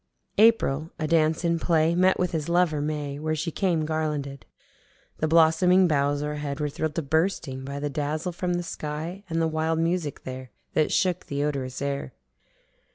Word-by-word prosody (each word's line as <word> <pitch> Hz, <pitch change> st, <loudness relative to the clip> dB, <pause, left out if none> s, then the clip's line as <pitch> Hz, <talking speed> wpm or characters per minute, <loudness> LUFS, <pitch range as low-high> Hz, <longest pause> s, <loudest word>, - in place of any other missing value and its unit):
April 165 Hz, -9 st, +4 dB
adance 160 Hz, +1 st, +2 dB
in 170 Hz, 0 st, +1 dB
play 160 Hz, -1 st, +2 dB
met 185 Hz, +2 st, +3 dB
with 180 Hz, -1 st, 0 dB
his 160 Hz, -1 st, -2 dB
lover 170 Hz, -4 st, +2 dB
May 145 Hz, -1 st, -3 dB
where 155 Hz, +1 st, -1 dB
she 165 Hz, +2 st, -2 dB
came 170 Hz, -3 st, 0 dB
garlanded. 150 Hz, -3 st, -3 dB, 0.7 s
The 155 Hz, -, +1 dB
blossoming 170 Hz, +3 st, +5 dB
boughs 145 Hz, -1 st, +1 dB
o'erhead 150 Hz, -1 st, -3 dB
were 150 Hz, -1 st, -1 dB
thrill'd 155 Hz, +1 st, -3 dB
to 165 Hz, -, -1 dB
bursting 160 Hz, -3 st, -1 dB
by 140 Hz, +1 st, -5 dB
the 145 Hz, -, -2 dB
dazzle 155 Hz, +4 st, -2 dB
from 175 Hz, +1 st, -2 dB
the 175 Hz, -, -2 dB
sky 160 Hz, +4 st, -5 dB
and 165 Hz, 0 st, -1 dB
the 165 Hz, -, +2 dB
wild 160 Hz, +1 st, 0 dB
music 165 Hz, -3 st, -1 dB
there 130 Hz, 0 st, -7 dB, 0.2 s
that 155 Hz, -, +2 dB
shook 180 Hz, -2 st, +1 dB
the 140 Hz, 0 st, -2 dB
odorous 135 Hz, -3 st, -3 dB
air. 140 Hz, -2 st, -3 dB
155 Hz, 170 wpm, -26 LUFS, 145-170 Hz, 0.7 s, blossoming